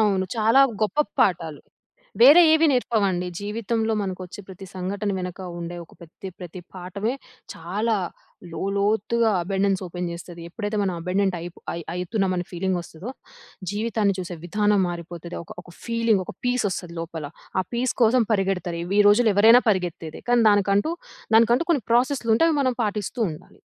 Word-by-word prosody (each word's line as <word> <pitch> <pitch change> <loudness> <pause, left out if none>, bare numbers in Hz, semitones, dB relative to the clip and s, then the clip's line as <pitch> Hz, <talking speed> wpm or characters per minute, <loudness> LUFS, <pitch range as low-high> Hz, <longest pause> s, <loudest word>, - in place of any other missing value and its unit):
అవును. 200 -3 +2
చాలా 225 +4 +4 0.2
గొప్ప 215 +8 -1 0.2
పాఠాలు. 165 -5 +1 0.6
వేరే 295 +8 +9
ఏవి 320 +1 +5
నేర్పవండి. 200 -8 +1
జీవితంలో 220 +2 -2
మనకొచ్చే 185 0 -6
ప్రతి 190 +1 -10
సంఘటన 195 +3 -3
వెనక 180 0 -5 0.2
ఉండే 170 +1 -6
ఒక - - -24
ప్రతి 170 +3 -10
ప్రతి 180 0 -8
పాఠమే 190 +6 -3 0.4
చాలా 205 +7 -1 0.6
లోలోతుగా 210 +5 +1
అబండెన్స్ 195 +1 0
ఓపెన్ 175 0 -4
జేస్తది. 170 0 -9
ఎప్పుడైతే 205 +3 -4
మనం 190 -2 0
అబండెంట్ 185 +2 0
అయిప్- 175 0 -9
అయ్ 170 -1 -6
అయితున్నాం 185 +2 -1
అని 175 0 -3
ఫీలింగొస్తదో 180 +2 -3 0.6
జీవితాన్ని 210 -1 0
చూసే 180 -1 -5
విధానం 205 +2 +2
మారిపోతది. 170 0 -7
ఒక, - - -10
ఒక 175 - -16
ఫీలింగ్, 230 -4 +1
ఒక - - -9
పీస్ 245 -1 +1
ఒస్తుంది 175 -2 -6
లోపల. 165 -2 -6 0.4
ఆ - - 0
పీస్ 245 +1 0
కోసం 235 +1 +4
పరిగెడతారు. 190 -4 -1
ఈ - - -5
వి 205 - +4
రోజుల్లో 215 +1 +4
ఎవరైనా 225 +4 +7
పరిగెత్తేదే. 175 -4 -3
కానీ, 240 -1 +4
దానికంటూ 205 - +2 0.4
దానికంటూ 235 +7 +4
కొన్ని 275 -10 +1
ప్రాసెస్లు 245 0 +2
ఉంటాయి. 330 +7 +4
అవి 295 - 0
మనం 255 -2 0
పాటిస్తూ 210 +3 -2
ఉండాలి. 155 - -13
200 Hz, 150 wpm, -24 LUFS, 180-225 Hz, 0.6 s, వేరే